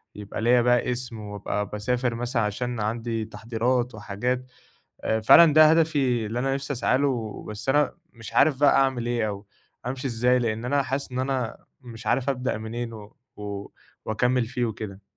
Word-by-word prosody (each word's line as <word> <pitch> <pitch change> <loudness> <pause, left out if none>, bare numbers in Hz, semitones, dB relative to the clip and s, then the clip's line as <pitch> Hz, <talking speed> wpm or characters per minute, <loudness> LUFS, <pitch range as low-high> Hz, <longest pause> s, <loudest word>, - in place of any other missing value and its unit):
يبقى 105 +1 -6
ليّا 120 +1 +4
بقى 125 0 +2
اسم 120 -2 -5
وأبقى 105 0 -3
باسافر 120 +3 -1
مثلًا 120 0 -1
عشان 120 +3 -2
عندي 115 +1 -2
تحضيرات 120 +3 -1
وحاجات. 125 +5 -2 0.6
آآ 110 0 +1
فعلًا 155 +8 +8
ده 155 0 +8
هدفي 140 -8 +2
اللي 115 +3 -3
أنا 135 +1 0
نِفسي 140 +1 -3
أسعى 125 +1 +1
له، 120 -7 -2
بس 105 +4 -7
أنا 145 0 +3 0.2
مش 115 -1 -10
عارف 140 -4 +4
بقى 145 - +5
أعمل 130 -3 +2
إيه، 120 -3 0
أو 100 0 -6 0.4
أمشي 130 +1 -3
إزاي، 125 +2 +2
لإن 115 -1 -2
أنا 140 +2 +1
حاسس 135 -1 -3
إن 125 - -3
أنا 130 -3 -2 0.2
مش 115 -2 -11
عارف 125 +4 +1
أبدأ 130 -4 -2
منين 115 +1 -5
و 105 -1 -11 0.2
و 100 -1 -6 0.4
وأكمّل 125 +2 +1
فيه 125 0 -2
وكده. 105 -3 -6
120 Hz, 175 wpm, -25 LUFS, 110-130 Hz, 0.6 s, فعلًا